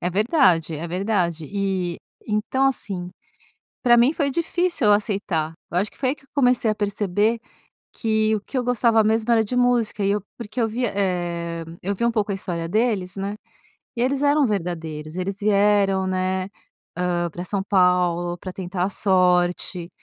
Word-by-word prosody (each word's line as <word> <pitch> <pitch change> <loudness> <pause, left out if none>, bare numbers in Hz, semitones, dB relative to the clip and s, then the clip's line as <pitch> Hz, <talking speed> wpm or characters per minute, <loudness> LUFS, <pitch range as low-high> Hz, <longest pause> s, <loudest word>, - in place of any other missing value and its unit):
É 180 - -1
verdade, 185 - +3
é 165 +3 -5
verdade 180 -3 -1
e 190 -3 -1 0.3
então 220 +5 +1
assim, 185 -8 -4 0.7
para 240 -2 +6
mim 240 +5 +5
foi 290 -3 0
difícil 340 -4 0
eu 205 - +7
aceitar, 195 -7 0 0.2
eu 175 - 0
acho 205 +3 0
que - - -20
foi 260 -2 +1
aí - - -1
que 285 - -23
eu - - -27
comecei 250 -5 +3
a 215 - 0
perceber 205 +2 0 0.5
que 220 -1 +1
o - - -4
que 240 - -8
eu 250 - 0
gostava 235 -2 +3
mesmo 220 +2 +1
era 225 -1 +4
de 220 - -5
música, 245 -4 +2
e 195 - +2
eu 205 -1 -1 0.2
porque 230 +1 -5
eu 225 - +2
via, 240 +2 -2
eh, 170 -3 -2 0.2
eu 200 +3 -1
vi 220 - -2
um 235 - +3
pouco 210 -2 0
a - - -1
história 175 -4 -4
deles, 205 -2 0
né, 200 +1 -3 0.6
e 235 - -2
eles 265 +2 +1
eram 290 0 +4
verdadeiros, 165 -6 -4
eles 190 +2 -3
vieram, 200 -2 +3
né, 185 0 -1 0.5
hã, 175 -1 0
para 175 - -6
São 200 +1 -1
Paulo, 180 -2 +2
para 185 +1 -7
tentar 180 -1 -3
a - - -1
sorte, 180 -2 +2
200 Hz, 185 wpm, -23 LUFS, 180-225 Hz, 0.7 s, eu